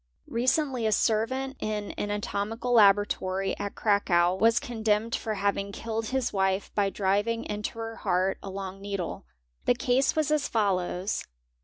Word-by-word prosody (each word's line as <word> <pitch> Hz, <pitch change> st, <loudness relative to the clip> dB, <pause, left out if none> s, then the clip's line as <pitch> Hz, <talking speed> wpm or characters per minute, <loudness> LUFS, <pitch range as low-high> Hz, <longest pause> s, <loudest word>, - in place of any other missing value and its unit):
Recently 255 Hz, 0 st, +1 dB
a -, -, +1 dB
servant 260 Hz, +6 st, 0 dB
in 210 Hz, -1 st, -3 dB
an 205 Hz, -, -4 dB
anatomical 210 Hz, +4 st, -2 dB
laboratory 195 Hz, -3 st, +3 dB
at 205 Hz, 0 st, -5 dB
3. 215 Hz, -, +2 dB
tacow 175 Hz, -1 st, +2 dB
was 230 Hz, +1 st, +4 dB
condemned 220 Hz, -1 st, 0 dB
for 220 Hz, -2 st, -2 dB
having 200 Hz, 0 st, -1 dB
killed 225 Hz, +1 st, -3 dB
his 260 Hz, 0 st, -1 dB
wife 190 Hz, 0 st, 0 dB
by 200 Hz, -1 st, +2 dB
driving 205 Hz, +4 st, 0 dB
into 210 Hz, +2 st, -4 dB
her 225 Hz, 0 st, -5 dB
eart 185 Hz, +2 st, +1 dB
a 195 Hz, -, -7 dB
long 195 Hz, 0 st, -6 dB
needle. 195 Hz, -, -4 dB, 0.4 s
The 245 Hz, -, +4 dB
case 250 Hz, +2 st, +2 dB
was 310 Hz, -1 st, +1 dB
as 300 Hz, -2 st, +2 dB
follows. 190 Hz, -2 st, 0 dB
210 Hz, 155 wpm, -28 LUFS, 195-230 Hz, 0.4 s, was